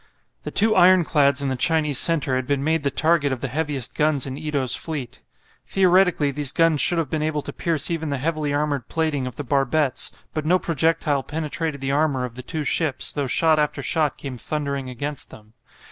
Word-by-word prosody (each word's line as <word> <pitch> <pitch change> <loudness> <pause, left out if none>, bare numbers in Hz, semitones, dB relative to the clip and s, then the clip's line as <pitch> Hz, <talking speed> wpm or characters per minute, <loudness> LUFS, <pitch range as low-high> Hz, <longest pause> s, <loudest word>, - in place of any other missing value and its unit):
The - - -6
two 215 +1 +3
ironclads 160 -7 +4
in 140 - -1
the 130 - -1
Chinese 150 0 +2
centre 150 -6 +4
had 130 -1 -2
been 140 -1 0
made 160 +1 +1
the 140 - 0
target 155 -1 +1
of 130 -2 -4
the - - -2
heaviest 145 -2 -1
guns 150 -3 +1
in 135 -1 -5
Ito's 145 -4 -1
fleet. 145 -7 -5 0.5
Theoretically 180 -5 +3
these 140 -1 -2
guns 165 -3 +3
should 175 - +5
have 160 -5 -2
been 155 - -1
able 155 -1 -2
to - - -6
pierce 165 -2 0
even 160 -2 -3
the 140 - -2
heavily 155 +1 -2
armoured 145 -3 -1
plating 155 -5 -1
of 125 - -8
the 145 - -6
barbettes, 140 +1 0 0.2
but 155 - -3
no 175 +4 +3
projectile 160 -3 0
penetrated 155 0 -4
the 135 0 -2
armour 140 -3 0
of 120 - -8
the 125 - -8
two 150 +4 -5
ships, 150 -2 0
though 145 -2 -3
shot 160 +3 +2
after 150 -1 -1
shot 155 -1 0
came 135 -3 -7
thundering 140 -1 -3
against 140 +3 -4
them. 110 0 -16
150 Hz, 205 wpm, -22 LUFS, 135-160 Hz, 0.5 s, should